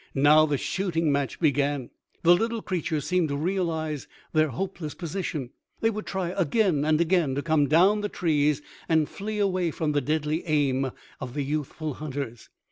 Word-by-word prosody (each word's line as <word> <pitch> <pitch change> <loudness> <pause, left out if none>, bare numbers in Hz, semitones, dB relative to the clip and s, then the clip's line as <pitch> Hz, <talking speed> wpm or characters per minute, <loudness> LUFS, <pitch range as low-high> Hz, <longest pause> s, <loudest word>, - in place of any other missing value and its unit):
Now 150 +3 +6
the 145 -2 0
shooting 165 -2 0
match 140 -1 -1
began. 145 -4 +1 0.3
The 175 +1 +7
little 225 +3 -1
creatures 160 -5 -2
seemed 180 -3 +1
to 140 - -1
realize 160 -3 -2 0.3
their 155 -1 +4
hopeless 155 +2 -4
position; 165 -7 -4 0.3
they 225 - +2
would 215 0 -6
try 190 -3 -2
again 180 -2 +1
and 155 0 +2
again 170 -5 +2
to 140 - -2
come 155 -3 +3
down 185 +8 +4
the 205 - -2
trees 150 -5 +1 0.3
and 160 -2 +3
flee 210 +5 -5
away 185 -4 +1
from 155 -1 -1
the 145 -1 +1
deadly 155 +3 -1
aim 135 -3 +1 0.3
of 130 -1 -6
the 145 - 0
youthful 150 +1 -3
hunters. 135 -5 -6
155 Hz, 170 wpm, -26 LUFS, 145-180 Hz, 0.3 s, The